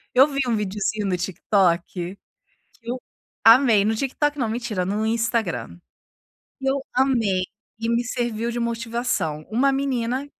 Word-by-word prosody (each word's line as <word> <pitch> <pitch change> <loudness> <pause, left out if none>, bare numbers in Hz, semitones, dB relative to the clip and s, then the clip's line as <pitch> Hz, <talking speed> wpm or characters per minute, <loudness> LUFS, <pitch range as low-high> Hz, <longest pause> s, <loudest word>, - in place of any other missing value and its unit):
eu 265 +3 +7
vi 275 -2 -3
um 235 - +2
videozinho 210 +1 -2
no 185 - +1
TikTok, 180 -1 +1 0.8
que 235 0 -9
eu 255 +1 -3 0.4
amei. 225 -2 +7
No 220 +1 +1
TikTok 290 +4 -1
não 240 -4 0
mentira, 220 -5 -2
no 205 +3 -1
Instagram. 220 - -1 0.8
Eu 270 0 0
amei 235 -8 +2 0.4
e 230 +1 -3
me 235 +1 +2
serviu 235 -1 -2
de 240 - -3
motivação. 230 -9 -2
Uma 255 +5 +3
menina, 265 -1 -1
230 Hz, 140 wpm, -23 LUFS, 205-250 Hz, 0.8 s, eu